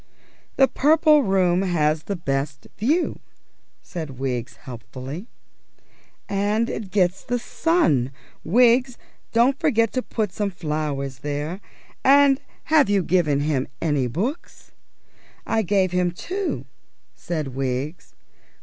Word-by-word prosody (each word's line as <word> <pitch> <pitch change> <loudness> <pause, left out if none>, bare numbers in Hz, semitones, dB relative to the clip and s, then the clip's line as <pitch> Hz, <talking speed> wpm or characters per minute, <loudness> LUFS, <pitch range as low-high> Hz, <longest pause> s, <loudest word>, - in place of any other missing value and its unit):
"The 270 - +5
Purple 305 +2 +4
Room 190 -5 +2
has 155 -4 +1
the 200 - -2
best 140 -3 -3
view," 300 - 0 0.6
said 155 -7 -7
Wiggs 125 -2 -3
helpfully. 130 - -8 1.0
"And 205 +3 0
it 210 -3 -5
gets 185 -2 +1
the 245 - -1
sun. 235 - +1 0.3
Wiggs, 245 +6 +4 0.3
don't 245 +4 +3
forget 230 -9 +2
to 255 - 0
put 215 -5 -2
some 205 0 -1
flowers 150 -6 -3
there. 150 +6 -4 0.4
And 275 0 +5 0.3
have 295 -8 +6
you 200 -2 +2
given 155 -6 +2
him 145 -3 0
any 145 -6 +1
books?" 215 - -4 0.7
"I 225 0 +1
gave 190 -2 +1
him 180 0 +1
two," 365 - -4 0.5
said 155 -5 -4
Wiggs. 135 +4 -4
180 Hz, 115 wpm, -23 LUFS, 145-235 Hz, 1.0 s, have